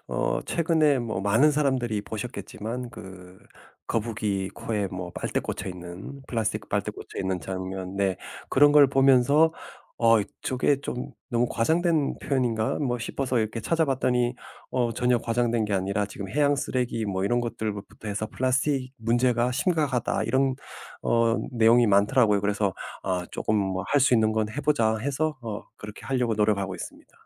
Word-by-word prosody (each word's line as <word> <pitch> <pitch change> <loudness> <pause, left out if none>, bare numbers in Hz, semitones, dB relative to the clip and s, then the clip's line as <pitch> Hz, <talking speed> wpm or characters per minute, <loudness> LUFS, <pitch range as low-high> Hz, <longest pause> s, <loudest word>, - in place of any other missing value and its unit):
어 - - 0
최근에 160 -4 +2
어 110 -6 -2
많은 110 +10 +4
사람들이 130 -7 0
보셨겠지만 110 +2 -6
그 95 -3 -12 0.5
거북이 105 -4 -1
코에 105 -3 -3
뭐 90 -1 -6
빨대 - - -2
꽂혀 - - -4
있는 90 +9 -8
플라스틱 110 -3 -2
빨대 100 -1 -1
꽂혀 - - -10
있는 95 -1 -1
장면 95 0 -5
네 95 -2 +1 0.3
그런 145 +2 +5
걸 145 -2 +7
보면서 135 +4 +4 0.5
어 115 -1 +5 0.2
'저게 130 +2 +1
좀 125 -2 -5 0.2
너무 120 0 +2
과장된 160 +4 +1
표현인가?' 120 -5 0
뭐 125 -4 0
싶어서 125 +2 -1
이렇게 110 +1 -1
찾아봤더니 130 -5 +1 0.4
어 120 -2 +1
전혀 125 +1 +2
과장된 115 0 0
게 105 -1 -1
아니라 100 +2 0
지금 100 -1 -7
해양 145 +5 +2
쓰레기 125 -4 -1
뭐 95 -1 -1
이런 120 +4 +2
것들부터 105 -2 -5
해서 105 +1 -2
"플라스틱 130 +2 0
문제가 120 +2 +1
심각하다." 145 - 0
이런 135 0 +1 0.5
어 115 0 +2 0.2
내용이 120 0 +5
많더라고요. 105 +1 +4
그래서 100 -1 0 0.3
아 90 -2 -1
조금 110 - -1
뭐 95 -1 -2
'할 145 - +2
수 130 -1 +4
있는 110 -2 +3
건 110 -1 0
해 140 +7 -4
보자.' 115 -7 +2
해서 145 +5 -1
어 110 -3 -5
그렇게 105 0 -10
하려고 125 -4 0
노력하고 100 -3 +1
있습니다. - - -10
115 Hz, 335 characters per minute, -26 LUFS, 105-130 Hz, 0.5 s, 걸